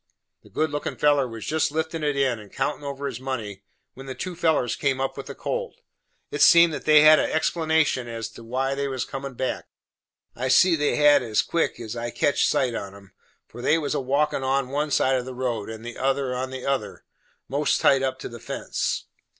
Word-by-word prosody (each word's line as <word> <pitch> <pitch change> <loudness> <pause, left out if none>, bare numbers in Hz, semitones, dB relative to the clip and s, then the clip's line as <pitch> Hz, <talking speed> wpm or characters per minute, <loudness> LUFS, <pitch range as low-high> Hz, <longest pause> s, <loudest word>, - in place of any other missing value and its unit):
The - - -19
good 155 -1 -1
lookin' 145 0 -3
feller 145 -3 +3
was 115 -2 -8
jest 160 0 0
liftin' 160 +1 -3
of 150 - +2
it 145 - -2
in, 130 -4 +1
and 105 -2 -14
countin' 135 +2 -2
over 140 0 -5
his 130 -4 -4
money, 115 -7 -5 0.3
when 135 +1 -11
the 130 - -6
two 185 -2 -5
fellers 160 -8 +1
come 135 -2 0
up 135 0 -2
with - - -8
the - - -7
colt. - - -4 0.6
It - - -3
seemed 170 -1 +7
that 145 - -6
they 155 -1 +7
had 155 0 +8
had - - 0
a - - -5
explanation 160 -5 +1
as 115 -1 -5
they 115 - -13 0.5
was 130 -2 -3
comin' 135 -1 -7
back; 130 +1 -3 0.7
I 130 +2 -2
see 170 +7 +5
they 150 -2 0
had 145 -1 +5
as 110 -3 0
quick 165 -7 -1
as 115 -1 -6
I 120 0 -3
catched 140 +4 +1
sight 125 -3 +1
on 100 -3 -6
'em, 100 -1 -16 0.3
for 120 - -11
they 155 - +3
was 150 -3 -2
a - - 0
walkin' 140 +2 0
one 135 +1 +1
on - - -13
one 145 +2 -1
side 135 -2 +2
of 125 - -4
the 130 -1 -7
road, 120 -5 -3
and 110 +1 -8
the 120 - -7
other 135 0 0
on 130 +1 -3
the 130 -1 -7
other, 135 -1 -2 0.4
most 145 +2 +1
tight 135 -1 +4
up 130 -1 -1
to - - -5
the 120 - -10
fence. 120 - -3
135 Hz, 225 wpm, -24 LUFS, 125-150 Hz, 0.7 s, had